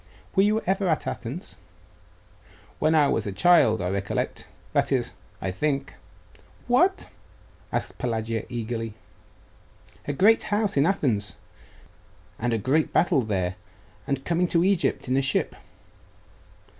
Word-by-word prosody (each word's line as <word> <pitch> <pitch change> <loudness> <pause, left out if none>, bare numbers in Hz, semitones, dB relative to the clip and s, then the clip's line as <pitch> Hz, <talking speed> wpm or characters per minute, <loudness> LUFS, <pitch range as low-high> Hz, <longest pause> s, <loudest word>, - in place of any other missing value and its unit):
Were 190 - +5
you 210 +2 +2
ever 190 +1 0
at 160 -3 0
Athens?' 140 - -5 1.2
'When 155 +1 +3
I 150 -2 +5
was - - 0
a - - -2
child; 110 - +4
I 90 - -1
recollect 100 0 -3 0.3
that - - +2
is, - - +1 0.3
I 95 - -2
think 140 +6 -1 0.4
' - - -27
'What?' 360 +11 +3 0.7
asked - - -3
Pelagia 115 -2 -2
eagerly. 115 -2 -4 1.1
'A 145 - -1
great 215 +10 +5
house 205 -1 0
in 140 +3 +4
Athens 115 - 0 1.0
and 120 +1 0
a 115 - +1
great 135 +8 +1
battle 170 -5 +3
there 95 -5 -2 0.5
and 140 -1 -2
coming 175 +1 +1
to 170 0 +2
Egypt 190 -7 +1
in 130 - +1
a - - +3
ship. 135 - +1
140 Hz, 135 wpm, -25 LUFS, 110-180 Hz, 1.2 s, Were